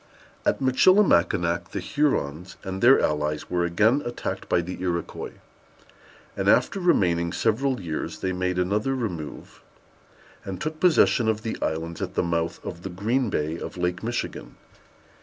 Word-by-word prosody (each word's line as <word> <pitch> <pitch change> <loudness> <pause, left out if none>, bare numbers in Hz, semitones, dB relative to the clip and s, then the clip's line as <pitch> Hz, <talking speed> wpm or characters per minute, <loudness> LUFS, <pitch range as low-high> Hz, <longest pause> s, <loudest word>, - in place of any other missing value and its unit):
At - - +2
Michilimackinac 95 - +3
the - - -2
Hurons 90 - -1
and 95 -1 -5
their 130 +3 +7
allies 75 0 -1
were 90 -1 +1
again 110 +11 +3
attacked 120 0 -5
by 85 - +3
the 90 +1 -7
Iroquois, 85 -2 -3 1.0
and, - - 0
after 195 - +3
remaining 85 - +2
several 125 +6 0
years, 80 -4 -4
they 95 0 -1
made 90 0 -1
another 105 +8 0
remove, 90 - -6 0.8
and 95 -2 -6
took 155 0 -4
possession 160 -9 +4
of 110 0 -1
the 115 - -3
islands 80 +1 -3
at - - -4
the - - +2
mouth 85 -1 -1
of 85 -2 -6
the 95 - -5
Green 110 +7 0
Bay 80 -1 -2
of - - -7
Lake 90 0 -1
Michigan. 120 +2 -4
95 Hz, 150 wpm, -25 LUFS, 85-120 Hz, 1.0 s, their